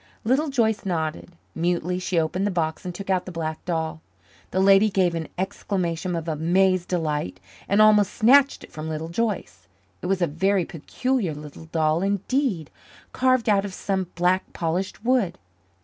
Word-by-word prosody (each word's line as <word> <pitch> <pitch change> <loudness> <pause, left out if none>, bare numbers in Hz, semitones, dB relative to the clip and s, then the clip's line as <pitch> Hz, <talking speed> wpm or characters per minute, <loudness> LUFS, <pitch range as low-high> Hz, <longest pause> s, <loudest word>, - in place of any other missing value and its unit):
Little 270 +7 +2
Joyce 225 -5 +1
nodded. 165 -2 -3 0.2
Mutely 175 +1 -1
she 180 -2 0
opened 180 +5 0
the - - +1
box 160 -4 -2
and 180 -1 -5
took 195 +1 -4
out 185 -1 +1
the - - -5
black 160 -2 -4
doll. 160 -2 -2 0.5
The 190 - -1
lady 195 +2 +6
gave 185 -3 +2
an 165 -1 -3
exclamation 180 -2 -2
of 165 0 -4
amazed 175 +3 +2
delight 150 - -2 0.3
and 205 +2 +5
almost 210 -2 +5
snatched 275 +5 +5
it - - -13
from 155 +1 -6
Little 160 +1 -4
Joyce. 210 +2 -3 0.3
It - - -4
was 190 0 +1
a - - +5
very 185 +4 +1
peculiar 200 - -2
little 150 +1 -10
doll 160 0 +1
indeed, 200 - -1 0.4
carved 255 -2 +2
out 200 -2 +4
of 195 -2 -6
some 190 -2 -2
black 180 +2 +1
polished 180 +6 -3
wood. 245 -8 +2
180 Hz, 165 wpm, -24 LUFS, 165-200 Hz, 0.5 s, lady